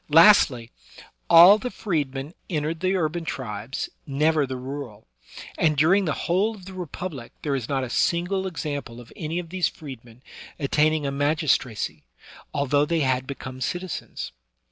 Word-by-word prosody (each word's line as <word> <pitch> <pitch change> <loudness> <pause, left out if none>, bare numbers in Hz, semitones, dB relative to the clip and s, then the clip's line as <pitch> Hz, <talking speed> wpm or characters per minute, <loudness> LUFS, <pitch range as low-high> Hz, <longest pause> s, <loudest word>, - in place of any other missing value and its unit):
Lastly, 150 - +6 0.6
all 175 +5 +9
the 250 - -3
freedmen 145 - -3 0.2
entered 160 -1 -2
the 185 +2 +1
urban 170 -1 -1
tribes, 115 -5 -4 0.2
never 150 +1 +2
the 130 0 -4
rural; 130 -4 -7 0.5
and 155 -2 +3
during 185 +7 +4
the 155 - 0
whole 200 +6 +1
of 190 -4 -14
the 190 - -9
Republic 175 -7 -6
there 145 -2 0
is 125 -4 -4
not 135 -2 0
a 130 - -4
single 185 +5 +1
example 145 -8 -5
of 120 - -13
any 160 +1 -4
of 175 -2 -4
these 185 0 +1
freedmen 125 -4 -11 0.3
attaining 150 +1 +2
a 140 - -1
magistracy, 145 -5 0 0.5
although 145 0 +2
they 165 +1 0
had 130 -1 0
be 140 - -4
come 130 0 -9
citizens. 180 +5 -4
150 Hz, 155 wpm, -25 LUFS, 130-175 Hz, 0.6 s, all